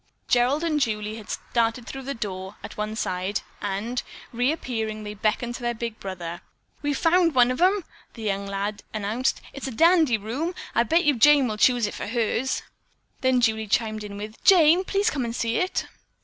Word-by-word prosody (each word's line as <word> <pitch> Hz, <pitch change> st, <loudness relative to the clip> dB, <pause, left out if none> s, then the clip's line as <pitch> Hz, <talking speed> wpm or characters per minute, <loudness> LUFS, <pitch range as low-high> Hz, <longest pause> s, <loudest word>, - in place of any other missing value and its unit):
Gerald 250 Hz, +6 st, +3 dB
and 315 Hz, -3 st, +1 dB
Julie 215 Hz, -3 st, -1 dB
had 215 Hz, -, -5 dB, 0.2 s
darted 230 Hz, 0 st, +1 dB
through 270 Hz, 0 st, -7 dB
a 275 Hz, -, -2 dB
door 190 Hz, -3 st, -5 dB
at -, -, -8 dB
one 215 Hz, +1 st, -3 dB
side 185 Hz, -1 st, -2 dB, 0.2 s
and, 205 Hz, +5 st, -2 dB, 0.3 s
reappearing, 235 Hz, -4 st, -1 dB
they 210 Hz, 0 st, -5 dB
beckoned 215 Hz, +3 st, -1 dB
to 245 Hz, -, -7 dB
their 240 Hz, 0 st, -1 dB
big 230 Hz, -1 st, -5 dB
brother. 175 Hz, -3 st, -6 dB, 0.4 s
"We've 290 Hz, -1 st, -1 dB
found 335 Hz, -2 st, +3 dB
one 245 Hz, 0 st, +5 dB
of 255 Hz, -, -3 dB
'em," 380 Hz, +1 st, +4 dB, 0.3 s
the 225 Hz, -, -8 dB
younger 200 Hz, -1 st, -2 dB
lad 205 Hz, +1 st, -2 dB
announced. 215 Hz, +5 st, -1 dB
"It's 275 Hz, -, -5 dB
in 260 Hz, -, -6 dB
a -, -, -14 dB
dandee 330 Hz, -8 st, +5 dB
room! 265 Hz, -, -3 dB, 0.2 s
I 235 Hz, -, +4 dB
bet 325 Hz, +9 st, +2 dB
you 295 Hz, -, +5 dB
Jane 285 Hz, +2 st, +6 dB
will 215 Hz, -2 st, -3 dB
choose 245 Hz, 0 st, +4 dB
it 205 Hz, -, -4 dB
for -, -, -5 dB
hers." 235 Hz, +3 st, 0 dB, 0.6 s
Then 260 Hz, -1 st, +2 dB
Julie 220 Hz, -1 st, +1 dB
chimed 215 Hz, 0 st, 0 dB
in 200 Hz, -1 st, -7 dB
with: 215 Hz, +2 st, -8 dB
"Jane, 350 Hz, -1 st, +6 dB
please 400 Hz, +3 st, +1 dB
come 275 Hz, -4 st, -2 dB
and 235 Hz, -1 st, -3 dB
see 230 Hz, -1 st, 0 dB
it." 365 Hz, -, 0 dB
235 Hz, 195 wpm, -25 LUFS, 215-275 Hz, 0.6 s, Jane